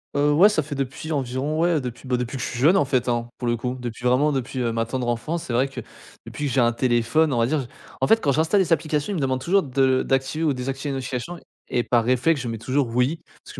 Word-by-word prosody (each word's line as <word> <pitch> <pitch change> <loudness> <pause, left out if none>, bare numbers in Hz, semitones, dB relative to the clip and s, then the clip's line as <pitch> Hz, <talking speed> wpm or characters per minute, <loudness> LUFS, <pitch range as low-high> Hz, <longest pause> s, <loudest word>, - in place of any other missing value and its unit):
Heu, 145 +1 +3
ouais, 170 +7 +7
ça 165 - +1
fait 145 0 -6
depuis 135 +4 -4
environ 140 +2 -2
ouais, 170 -3 +2
depuis, 125 +1 -7
bah, 125 -1 +1
depuis 125 +2 -4
que - - -4
je - - -2
suis 120 - -5
jeune 165 +9 +5
en 145 - +3
faite 130 -2 0
hein, 120 0 -1
pour 125 - -3
le 120 0 +1
coup, 125 +2 -3
depuis 120 0 -6
vraiment 135 +5 +3
depuis 130 -1 -3
ma 115 -1 0
tendre 125 +1 -3
enfance. 155 +8 -2
C'est 125 - -5
vrai 130 +3 +2
que 135 - -8 0.5
depuis 145 - -5
que 135 - -3
j'ai 135 - +3
un 120 0 +3
téléphone, 125 +5 +1
on 120 - +1
va 115 - +3
dire 150 +2 0
je 130 - -7 0.3
en 135 - +2
fait 225 0 +4
quand 140 - +2
j'installe 160 +8 +2
des 170 -3 -2
applications, 155 +1 -1
ils 200 - -2
me - - -1
demandent 130 -2 -1
toujours 195 +4 +2
de 130 -1 +2
d'activer 135 +4 -1
ou 150 -3 +2
désactiver 135 +3 -4
les - - -3
notifications 135 +6 -5 0.3
et 120 - +1
par 120 -1 +1
réflexe, 130 +5 +2
je 125 - -5
mets 115 - -4
toujours 130 +3 0
«oui», 130 +7 +1 0.2
parce - - -12
que - - -14
130 Hz, 280 wpm, -23 LUFS, 125-150 Hz, 0.5 s, ouais